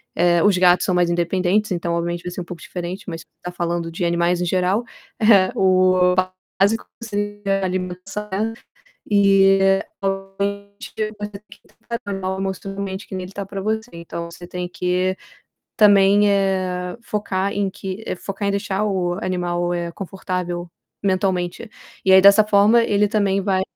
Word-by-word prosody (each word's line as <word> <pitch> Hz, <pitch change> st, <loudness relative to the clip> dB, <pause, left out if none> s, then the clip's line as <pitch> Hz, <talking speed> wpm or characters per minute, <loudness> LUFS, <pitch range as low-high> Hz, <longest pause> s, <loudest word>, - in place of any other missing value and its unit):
Eh, 175 Hz, 0 st, +3 dB
os 205 Hz, -2 st, +4 dB
gatos 180 Hz, 0 st, +4 dB
são 185 Hz, -, +1 dB
mais 175 Hz, -1 st, +3 dB
independentes, 180 Hz, +4 st, +1 dB
então 170 Hz, -1 st, -1 dB
obviamente 170 Hz, +1 st, -2 dB
vai 180 Hz, -, -5 dB
ser 180 Hz, -, -5 dB
um -, -, -4 dB
pouco 170 Hz, -1 st, -9 dB
diferente, 180 Hz, +3 st, -6 dB
mas 165 Hz, -2 st, -5 dB, 0.2 s
tá 180 Hz, -, -5 dB
falando 170 Hz, -1 st, -2 dB
de 170 Hz, +2 st, -4 dB
animais 170 Hz, +1 st, +1 dB
em 180 Hz, -, 0 dB
geral. 185 Hz, +5 st, +1 dB, 0.4 s
É, 205 Hz, -4 st, +5 dB
o 185 Hz, -1 st, +4 dB, 0.4 s
básico 210 Hz, +3 st, +2 dB, 0.2 s
seria 205 Hz, -2 st, -2 dB
alimentar, 185 Hz, +3 st, -4 dB
né. 220 Hz, +3 st, -1 dB, 0.6 s
E 195 Hz, -1 st, +5 dB, 0.4 s
obviamente, 200 Hz, +1 st, -4 dB, 0.3 s
você 205 Hz, 0 st, -4 dB
tem 200 Hz, +1 st, -10 dB
que -, -, -15 dB, 0.3 s
tratar 235 Hz, -3 st, -4 dB
o -, -, -2 dB
animal 190 Hz, 0 st, -3 dB
emocionalmente 195 Hz, +1 st, -4 dB
que -, -, -7 dB
nem 185 Hz, -, -3 dB
ele 185 Hz, -, -10 dB
tá 200 Hz, -1 st, -5 dB
pra 195 Hz, 0 st, -6 dB
você. 220 Hz, +3 st, -2 dB
Então 170 Hz, 0 st, -7 dB
você 175 Hz, +1 st, -11 dB
tem 180 Hz, 0 st, -5 dB
que 180 Hz, +1 st, -1 dB, 0.6 s
também, 205 Hz, -1 st, +5 dB
eh, 185 Hz, -2 st, 0 dB
focar 200 Hz, -3 st, -2 dB
em 200 Hz, -2 st, -1 dB
que 190 Hz, +2 st, -6 dB
focar 195 Hz, +2 st, -4 dB
em -, -, +2 dB
deixar 200 Hz, 0 st, -1 dB
o 185 Hz, -4 st, 0 dB
animal, 175 Hz, -1 st, -1 dB
eh, 170 Hz, -1 st, -3 dB
confortável 180 Hz, -2 st, -4 dB, 0.3 s
mentalmente. 185 Hz, +1 st, -1 dB, 0.3 s
E 190 Hz, -, +4 dB
aí 190 Hz, -, +9 dB
dessa 200 Hz, +2 st, +7 dB
forma 210 Hz, +3 st, +5 dB
ele 210 Hz, -2 st, +2 dB
também 200 Hz, -2 st, +1 dB
vai 190 Hz, -1 st, +1 dB
190 Hz, 165 wpm, -21 LUFS, 180-200 Hz, 0.6 s, aí